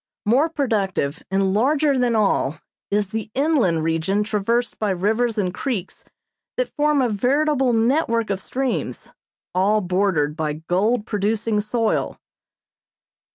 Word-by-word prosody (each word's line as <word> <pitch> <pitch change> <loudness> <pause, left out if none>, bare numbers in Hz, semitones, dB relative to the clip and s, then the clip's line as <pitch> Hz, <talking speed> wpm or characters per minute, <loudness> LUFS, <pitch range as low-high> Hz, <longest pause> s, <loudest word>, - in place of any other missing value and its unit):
More 265 +10 +3
productive 200 - -1
and 195 0 +1
larger 280 +6 +2
than 245 -2 +2
all 195 -8 +1 0.3
is 205 -1 0
the 220 +1 -4
inland 260 - +2
region 165 +6 0
traversed 225 +3 -1
by 215 - 0
rivers 220 +5 0
and 185 -3 0
creeks 195 -3 -4 0.5
that - - -1
form 295 -2 +2
a 245 - +1
veritable 265 +5 +1
network 230 -1 +1
of 195 -1 -2
streams, 265 +3 -3 0.4
all 200 +4 +3
bordered 180 -5 0
by 155 -2 -2
gold 190 +9 0
producing 210 +1 0
soil. 225 +1 -1
215 Hz, 125 wpm, -22 LUFS, 190-245 Hz, 0.5 s, More